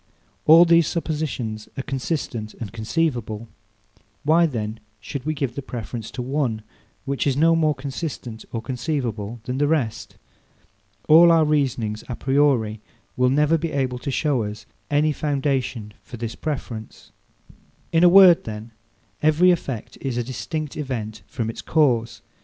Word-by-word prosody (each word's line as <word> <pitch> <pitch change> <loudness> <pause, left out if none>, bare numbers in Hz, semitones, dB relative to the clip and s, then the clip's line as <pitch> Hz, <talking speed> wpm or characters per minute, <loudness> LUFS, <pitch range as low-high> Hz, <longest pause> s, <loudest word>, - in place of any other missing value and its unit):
All 165 +3 +9
these 170 -2 +5
suppositions 145 -10 -3
are 135 - -2
consistent 130 -5 -3
and 115 -3 -7
conceivable. 115 -2 -2 0.8
Why 165 +3 +4
then 110 -5 -4 0.2
should 135 +7 -6
we 155 - 0
give 135 -4 -2
the 140 - -5
preference 120 -3 -6
to 125 - -5
one, 125 -5 -1 0.4
which 140 +1 -1
is 135 -1 +1
no 165 +2 +5
more 155 -2 +2
consistent 130 -4 -6
or 115 -1 -4
conceivable 120 -4 -3
than 125 +2 -3
the 145 - +3
rest? 145 -8 -1 0.9
All 170 +2 +8
our 165 -1 +5
reasonings 125 -8 0
a 125 - -3
priori 130 -6 +1 0.3
will 125 0 +3
never 150 +4 +3
be 165 0 -3
able 130 -3 -1
to 140 - -5
show 140 -2 +1
us 105 -1 -6 0.2
any 150 +1 +2
foundation 135 -7 -2
for 120 - -10
this 115 0 -4
preference. 125 -7 -6 0.8
In 165 +1 +3
a 175 - +8
word, 185 -2 +7
then, 110 +1 -7 0.5
every 155 +4 +5
effect 125 -8 -4
is 130 -3 -3
a 120 - 0
distinct 145 +4 -5
event 115 -7 -4
from 110 +2 -3
its 115 - -5
cause. 125 -7 +1
135 Hz, 150 wpm, -23 LUFS, 115-155 Hz, 0.9 s, All